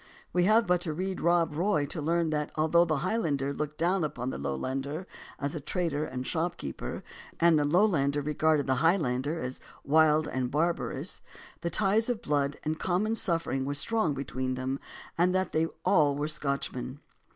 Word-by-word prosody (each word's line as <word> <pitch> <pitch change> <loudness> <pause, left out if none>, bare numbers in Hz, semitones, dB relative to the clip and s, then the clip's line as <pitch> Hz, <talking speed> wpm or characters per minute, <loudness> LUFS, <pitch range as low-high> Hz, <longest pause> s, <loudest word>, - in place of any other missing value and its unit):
We 180 +1 +3
have 220 +3 +5
but 180 -2 +2
to 160 -3 -2
read 185 +3 -3
Rob 170 -2 +2
Roy 175 -3 +1
to 150 +3 -5
learn 165 +1 +1
that 150 -1 -1
although 160 +2 +4
the 155 -3 0
Highlander 145 -10 0
looked 150 +1 -4
down 175 +2 +1
upon 130 -4 -3
the - - -5
Lowlander 135 - -3 0.3
as 140 0 -3
a 160 - -3
trader 155 -1 -1
and 130 -3 -5
shopkeeper, 160 - -3 0.4
and 170 -2 +5
the 145 - +2
Lowlander 145 -5 +2
regarded 150 0 +2
the 130 -1 +1
Highlander 155 -3 +1
as 125 -2 -4 0.2
wild 155 +1 +4
and 130 -1 -2
barbarous, 165 +5 -1 0.4
the 170 - -2
ties 210 +6 +2
of 240 -3 -2
blood 145 -1 0
and 155 +1 -2
common 195 +5 +1
suffering 165 -10 0
were 140 +1 -2
strong 195 -3 +2
between 130 -1 -3
them 130 +2 -3 0.4
and 180 +2 +3
that 185 0 0
they 160 +1 +1
were - - -16
all 145 -1 +3
Scotchmen. 140 -3 -3
155 Hz, 175 wpm, -29 LUFS, 140-175 Hz, 0.4 s, have